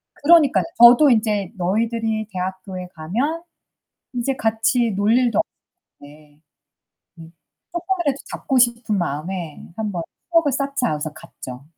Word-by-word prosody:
그러니깐요. 305 Hz, -2 st, +4 dB
저도 245 Hz, +5 st, +8 dB
인제 210 Hz, -5 st, +1 dB
너희들이 220 Hz, +3 st, -1 dB
대학교에 185 Hz, 0 st, -5 dB
가면 245 Hz, -, -2 dB, 0.7 s
이제 250 Hz, +2 st, -1 dB
같이 225 Hz, +1 st, +1 dB
놀 205 Hz, +3 st, +2 dB
일도 240 Hz, -4 st, +2 dB, 0.6 s
없는데 145 Hz, +1 st, -17 dB, 0.8 s
네. 165 Hz, -, -11 dB, 0.5 s
쪼끔이라도 345 Hz, -5 st, -1 dB
잡고 265 Hz, -2 st, -1 dB
싶은 235 Hz, -3 st, +2 dB
마음에 170 Hz, 0 st, -4 dB
'한번 205 Hz, -6 st, -3 dB, 0.3 s
추억을 330 Hz, -5 st, +3 dB
쌓자.' 275 Hz, -, -1 dB
해서 150 Hz, 0 st, -4 dB
갔죠. 130 Hz, -3 st, -10 dB
220 Hz, 270 characters per minute, -21 LUFS, 180-255 Hz, 0.8 s, 저도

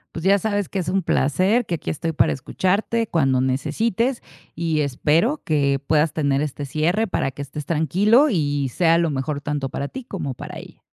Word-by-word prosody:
Pues 165 Hz, -, -5 dB
ya 200 Hz, +1 st, +4 dB
sabes 205 Hz, -2 st, -1 dB
que 195 Hz, -, -2 dB
es 175 Hz, -, -3 dB
un 190 Hz, +1 st, 0 dB
placer, 185 Hz, -, +2 dB
que 175 Hz, -, -2 dB
aquí 160 Hz, -, -6 dB
estoy 165 Hz, +2 st, -2 dB
para -, -, +3 dB
escucharte 200 Hz, -, 0 dB
cuando 135 Hz, -6 st, +2 dB
necesites. 185 Hz, -, 0 dB, 0.3 s
Y 160 Hz, -2 st, -1 dB
espero 150 Hz, -, +1 dB
que 140 Hz, -3 st, +1 dB
puedas 155 Hz, 0 st, +2 dB
tener 140 Hz, -2 st, +1 dB
este 145 Hz, -1 st, -4 dB
cierre 160 Hz, +10 st, 0 dB
para 160 Hz, -8 st, -1 dB
que 140 Hz, -, -8 dB
estés 140 Hz, +1 st, -6 dB
tranquilo 205 Hz, -, +3 dB
y 145 Hz, -, 0 dB
sea 165 Hz, +4 st, +3 dB
lo 170 Hz, -1 st, +1 dB
mejor 140 Hz, +1 st, -3 dB
tanto 145 Hz, -2 st, -2 dB
para 140 Hz, +2 st, -4 dB
ti, 265 Hz, -2 st, -8 dB
como 145 Hz, -, -4 dB
para -, -, -8 dB
ella. -, -, -12 dB
160 Hz, 190 wpm, -22 LUFS, 140-195 Hz, 0.3 s, ya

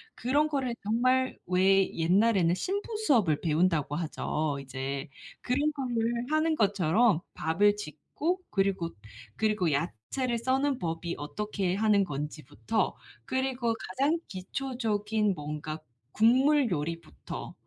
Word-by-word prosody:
그런 285 Hz, +6 st, +2 dB
거를 270 Hz, -5 st, -1 dB
정말 255 Hz, +5 st, +2 dB
왜 190 Hz, +2 st, +3 dB
옛날에는 180 Hz, +1 st, +3 dB
신부 405 Hz, -, -3 dB
수업을 205 Hz, -, +3 dB
배운다고 160 Hz, -2 st, +1 dB
하죠. 155 Hz, -2 st, -2 dB
이제 135 Hz, +1 st, -4 dB, 0.3 s
그런 285 Hz, +5 st, +1 dB
거를 240 Hz, -4 st, -1 dB, 0.2 s
하는 310 Hz, +1 st, +2 dB
것처럼 200 Hz, -, +3 dB, 0.2 s
밥을 200 Hz, +7 st, +3 dB
짓고 210 Hz, -, -3 dB
그리고, 195 Hz, -4 st, 0 dB, 0.5 s
그리고 210 Hz, -6 st, +1 dB
야채를 170 Hz, -, -2 dB
써는 265 Hz, +3 st, +1 dB
법이 170 Hz, 0 st, -3 dB
어떻게 190 Hz, +4 st, -2 dB
하는 210 Hz, -1 st, +3 dB
건지부터 150 Hz, -, -3 dB, 0.3 s
그리고 260 Hz, -3 st, 0 dB, 0.2 s
가장 280 Hz, -, +1 dB
기초적인 215 Hz, 0 st, -1 dB
뭔가 150 Hz, +1 st, -5 dB, 0.3 s
국물 260 Hz, +3 st, +4 dB
요리부터 165 Hz, +1 st, -5 dB
205 Hz, 260 characters per minute, -29 LUFS, 165-255 Hz, 0.5 s, 국물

